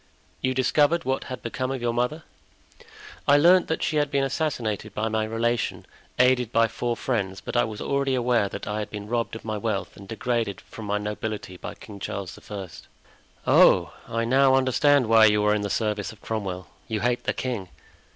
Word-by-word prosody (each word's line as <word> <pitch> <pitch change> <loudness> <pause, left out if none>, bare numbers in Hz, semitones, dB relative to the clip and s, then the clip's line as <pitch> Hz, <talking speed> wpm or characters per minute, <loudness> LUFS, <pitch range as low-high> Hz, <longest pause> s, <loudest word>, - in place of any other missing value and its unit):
"You 130 0 0
discovered 150 +5 +2
what 130 0 -1
had 130 -2 -7
become 130 +2 -3
of 135 -1 -2
your 120 -1 -1
mother?" 125 +7 -1 1.0
"I 145 - +7
learned 175 +4 +5
that 160 - -1
she 155 - 0
had 145 -1 +2
been 140 -1 +1
assassinated 120 -8 -2
by 110 +1 -1
my 110 0 0
relation, 115 +2 -1 0.3
aided 125 -2 +3
by 115 -1 +4
four 120 +1 -2
friends, 100 -7 -2
but - - -7
I 120 - +4
was 110 -1 -7
already 140 -1 0
aware 120 -4 +2
that - - -6
I 105 0 -2
had 105 - -4
been 105 -1 -7
robbed 115 0 -1
of 110 - -9
my 110 -1 -2
wealth 105 -2 -2
and 100 - -12
degraded 115 -2 -2
from 110 - -10
my 105 0 0
nobility 105 -2 -4
by - - -7
King 105 -2 -11
Charles 95 -2 -5
I." 100 -3 -5 0.8
"Oh! - - +5
I 115 0 -1
now 130 +2 +4
understand 135 +1 +3
why 110 0 +7
you 105 -1 +4
are 105 - +4
in 105 - 0
the 100 - -2
service 105 -2 -1
of 110 - -15
Cromwell; 95 -5 -4 0.2
you 110 -2 -2
hate 120 0 0
the - - +2
king." 115 -8 -4
115 Hz, 200 wpm, -25 LUFS, 105-130 Hz, 1.0 s, I